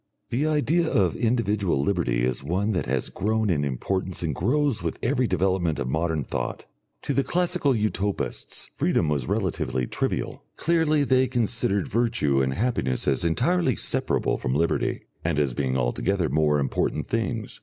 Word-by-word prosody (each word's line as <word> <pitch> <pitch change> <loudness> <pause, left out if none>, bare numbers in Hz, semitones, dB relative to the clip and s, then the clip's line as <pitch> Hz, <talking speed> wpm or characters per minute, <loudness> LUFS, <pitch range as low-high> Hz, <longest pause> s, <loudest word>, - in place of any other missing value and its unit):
The 140 +6 +1
idea 155 +3 +2
of 90 -5 +2
individual 105 - +1
liberty 70 -7 +1
is 65 +1 -2
one 95 +8 0
that 90 -10 -1
has 65 0 0
grown 110 0 0
in 75 -4 +1
importance 90 +7 -2
and 80 -3 -1
grows 135 - +1
with 85 -1 -3
every 125 0 +2
development 90 -4 +1
of 70 -2 -2
modern 80 +2 0
thought. - - -4 0.4
To 140 - -1
the 140 - +2
classical 175 -6 +1
Utopists 105 -2 -2
freedom 80 - +1
was 70 -4 -1
relatively 65 -1 -1
trivial. - - -2
Clearly 160 -3 +2
they 130 -1 +3
considered 110 -5 0
virtue 110 - +1
and 65 0 0
happiness 95 - 0
as 70 +1 +2
entirely 130 - +2
separable - - 0
from 65 +2 -1
liberty, 80 +3 0 0.2
and 80 -2 0
as 70 -4 +1
being 65 0 -1
altogether 80 +8 0
more 75 +1 +2
important 70 -2 -1
things. - - -3
95 Hz, 155 wpm, -25 LUFS, 75-120 Hz, 0.4 s, they